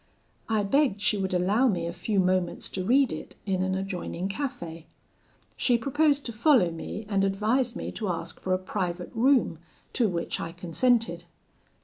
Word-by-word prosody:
I 215 -2 +2
begged 260 0 +2
she 210 - +2
would 190 -1 -1
allow 195 +8 +3
me 175 -7 0
a 170 - -3
few 195 +3 -1
moments 185 -1 +1
to 185 - -4
read 255 +6 +3
it - - -8
in 190 -2 0
an 185 0 0
adjoining 190 -1 -3
cafe. 195 - -5 0.7
She 245 -2 +3
proposed 285 +3 +1
to 235 - -4
follow 225 - +4
me, 180 +6 -6
and 200 -2 +1
advised 220 +6 +1
me - - -4
to 210 -4 -4
ask 170 -1 -4
for 185 - -4
a - - 0
private 185 -2 -3
room, 240 - +3 0.3
to 230 -4 +2
which 170 -2 -2
I 165 - -5
consented. 175 +1 +1
195 Hz, 170 wpm, -27 LUFS, 180-240 Hz, 0.7 s, follow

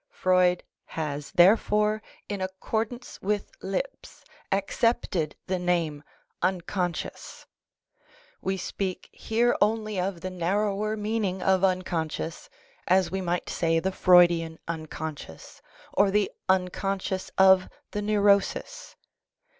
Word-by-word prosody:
Freud 180 -1 +2 0.3
has, 150 -2 -3
therefore, 210 +3 +4 0.3
in 200 -2 -4
accordance 220 +6 -4
with 205 +1 -1
Lipps," - - -5 0.3
accepted 195 -5 0
the 185 -1 -1
name 170 -4 0 0.2
" - - -48 0.2
unconscious." 175 -1 -4 1.0
We 190 0 -1
speak 185 0 -4
here 235 +2 +1
only 215 -1 +1
of 180 -1 -2
the 185 0 -4
narrower 205 +4 0
meaning 210 -3 -1
of 190 0 +3
unconscious, 170 -4 -1 0.4
as 185 0 +3
we 190 0 -2
might 175 -1 -2
say 165 -1 +1
the 190 +3 -1
Freudian 175 -3 +4
unconscious 155 - -7 0.3
or 200 0 +4
the 205 0 +1 0.2
unconscious 190 +1 0
of 190 -1 +6 0.2
the 210 - -2
neurosis. 205 - +1
190 Hz, 105 wpm, -27 LUFS, 175-205 Hz, 1.0 s, of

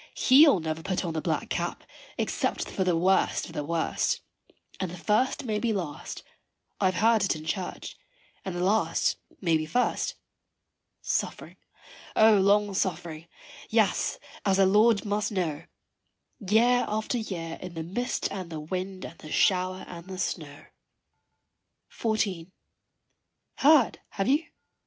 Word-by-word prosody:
He'll 275 - +6
never 160 0 -3
put 185 +1 -2
on 165 - -3
the 160 - -2
black - - -2
cap - - -2 0.3
except - - -1
for 190 - 0
the 180 -2 +2
worst 190 +3 +2
of - - -11
the 150 - -3
worst, 165 +2 -1 0.6
And 185 - -2
the 180 - -8
first 220 +9 +1
may 215 -3 -1
be 230 0 0
last 170 -8 -5 0.6
I - - +1
have 185 - 0
heard 225 -2 +4
it 195 - +1
in 155 0 -8
church 185 +2 -4 0.5
and 190 -2 -5
the 175 - -1
last 210 +4 +2 0.2
may 165 -4 +3
be 155 0 -4
first. 245 +11 0 0.9
Suffering - - -3 0.6
O 220 -1 +6
long 200 +1 +3
suffering 170 -4 -3 0.4
yes, - - +2 0.3
as 195 -2 +2
the 195 - +5
Lord 210 +3 +4
must 205 +1 -1
know, 165 -6 -2 0.7
Year 235 +4 +3
after 220 +3 -1
year 170 -7 -5
in 180 -2 -8
the 165 - -3
mist 225 +10 -2
and 185 -3 -5
the 160 -2 -5
wind 185 +4 -5
and 165 - -10
the 155 - -10
shower 185 0 +2
and 170 0 -10
the 190 -1 -7
snow. 155 -5 -4 1.3
XIV. 200 -6 -1 1.1
Heard, 285 -4 +5
have 195 - -2
you? 290 +5 +2
190 Hz, 145 wpm, -27 LUFS, 170-215 Hz, 1.3 s, He'll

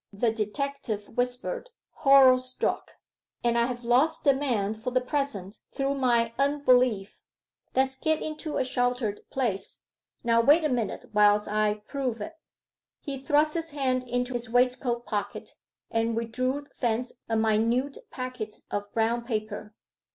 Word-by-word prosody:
the 220 +3 +1
detective 225 -1 -3
whispered, 250 - -2 0.3
horror 270 -2 +7
struck. 255 0 -3 0.5
'And 235 -1 +2
I 235 0 +3
have 245 -1 -5
lost 265 +7 +2
the 280 - +5
man 235 -7 0
for 220 +3 -4
the 255 0 +2
present 250 -7 -3
through 275 0 0
my 240 -4 +2
unbelief. 255 -7 +2 0.5
Let's 265 0 +2
get 315 +3 0
into 310 0 -4
a - - +1
sheltered 245 -4 -1
place.... 230 -8 -2 0.4
Now 230 -1 +4
wait 295 +7 +5
a 305 - +2
minute 235 -6 -2
whilst 210 0 +4
I 210 0 0
prove 260 -5 -2
it.' 325 +9 -7 0.6
He 275 -2 -5
thrust 295 +3 +2
his 330 -1 -2
hand 255 -2 +1
into 245 +1 -1
his 240 -1 -3
waistcoat 245 0 +1
pocket, 205 -2 -4 0.4
and 225 0 +1
withdrew 255 +5 -1 0.2
thence 240 0 0 0.2
a 225 - +1
minute 230 +5 +1
packet 255 -4 -5 0.2
of 205 0 -3
brown 230 +1 +1
paper. 215 -2 -4
245 Hz, 145 wpm, -27 LUFS, 220-270 Hz, 0.6 s, horror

